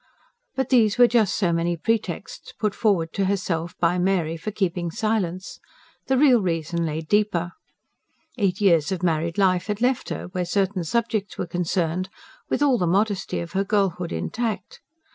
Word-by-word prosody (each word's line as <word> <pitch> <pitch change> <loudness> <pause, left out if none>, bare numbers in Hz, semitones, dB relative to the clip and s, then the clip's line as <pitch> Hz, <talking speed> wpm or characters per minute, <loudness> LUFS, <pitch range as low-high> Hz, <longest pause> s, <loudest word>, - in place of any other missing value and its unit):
But 265 -1 -1
these 225 -5 +4
were 245 - +8
just 230 -5 +2
so 175 -4 +1
many 170 +1 0
pretexts 225 +6 -3
put 210 -2 -1
forward 185 -8 +1
to 195 - 0
herself 180 -3 -2
by 175 +1 +2
Mary 175 -3 +1
for 165 +6 -5
keeping 180 -4 -1
silence; 185 -1 -2 0.5
the 265 - +2
real 255 -4 +5
reason 170 -1 -1
lay 155 +1 -3
deeper. 175 -1 0 0.9
Eight 195 -2 +1
years 170 -7 +3
of 185 -2 -3
married 165 0 0
life 185 -2 +2
had 210 -1 -2
left 250 +1 0
her, - - -4
where 180 0 -2
certain 190 +1 0
subjects 215 +2 -1
were - - -2
concerned, 175 +1 -1 0.4
with - - +1
all 265 -5 +3
the 180 - +1
modesty 200 +1 0
of 170 - -7
her 195 0 0
girlhood 190 -4 0
intact. 220 -5 -3
185 Hz, 165 wpm, -24 LUFS, 170-210 Hz, 0.9 s, were